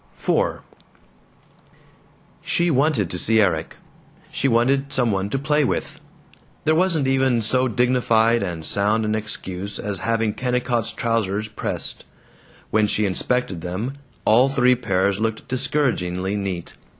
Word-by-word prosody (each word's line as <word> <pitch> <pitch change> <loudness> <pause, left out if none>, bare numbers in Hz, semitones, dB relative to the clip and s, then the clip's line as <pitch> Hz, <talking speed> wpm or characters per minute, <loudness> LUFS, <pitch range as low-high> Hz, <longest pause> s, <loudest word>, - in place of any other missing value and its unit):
IV - - 0 1.8
She 170 0 +1
wanted 135 - +2
to 90 - -4
see 110 +6 +2
Erik. 90 -7 +1 0.6
She - - 0
wanted 135 +3 +2
some 125 -5 +2
one 95 0 -1
to 135 - -1
play 150 +2 +1
with! 130 - -2 0.7
There 155 - +4
wasn't 165 -3 +2
even 130 -3 +2
so 130 +4 +2
dignified 120 -2 +2
and 85 -4 -4
sound 105 +4 +1
an 105 - 0
excuse 100 -2 -4
as 100 -3 -4
having 115 +1 0
Kennicott's 125 -1 -1
trousers 110 -2 -1
pressed; 105 - -3 0.7
when 110 0 +3
she 105 +1 +1
inspected 100 -1 -1
them, 105 - -4 0.3
all 125 +5 +5
three 125 -2 +4
pairs 100 -5 0
looked 110 0 -2
discouragingly 120 -9 -1
neat. 95 -4 -4
115 Hz, 130 wpm, -22 LUFS, 100-130 Hz, 1.8 s, all